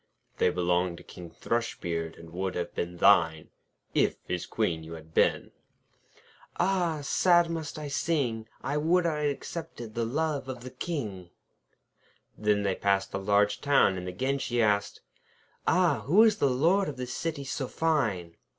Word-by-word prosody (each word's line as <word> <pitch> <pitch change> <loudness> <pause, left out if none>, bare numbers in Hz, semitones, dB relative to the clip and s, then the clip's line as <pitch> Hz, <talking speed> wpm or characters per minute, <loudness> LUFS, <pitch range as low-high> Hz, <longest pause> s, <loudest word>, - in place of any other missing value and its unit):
'They - - +4
belong 90 0 0
to - - -13
King 90 -1 -10
Thrushbeard, 85 -5 -3
and 85 0 -12
would 95 +2 -3
have 85 -1 -3
been 85 0 -4
thine, 85 -4 +4 0.4
If - - +2
his - - -4
Queen 80 -1 -1
you 80 +1 -9
had 80 0 -11
been.' - - +2 1.1
'Ah! 175 -5 +1
sad 175 +3 +3
must 160 -3 -4
I 150 -1 -5
sing! 135 -7 -1 0.2
I 145 +2 -1
would 170 +4 +2
I'd 150 -3 +1
accepted 140 -6 -6
the 115 - -1
love 140 +2 -1
of 125 -2 -6
the 130 +1 -8
King.' 105 - -5 1.1
Then 105 -1 +1
they 100 -1 +1
passed 95 0 0
through - - -2
a 95 +1 -7
large 100 0 +3
town, 140 -9 +4
and 90 0 -5
again 130 +10 -1
she 120 -2 -1
asked: 105 -2 +1 0.7
'Ah! 165 -9 +3
who 195 +9 +6
is 215 -2 +4
the 140 - +2
Lord 165 +9 +2
of 140 - -7
this 125 -1 -4
city 155 -2 -3
so 135 0 -3
fine?' 110 - -1
120 Hz, 165 wpm, -28 LUFS, 95-155 Hz, 1.1 s, who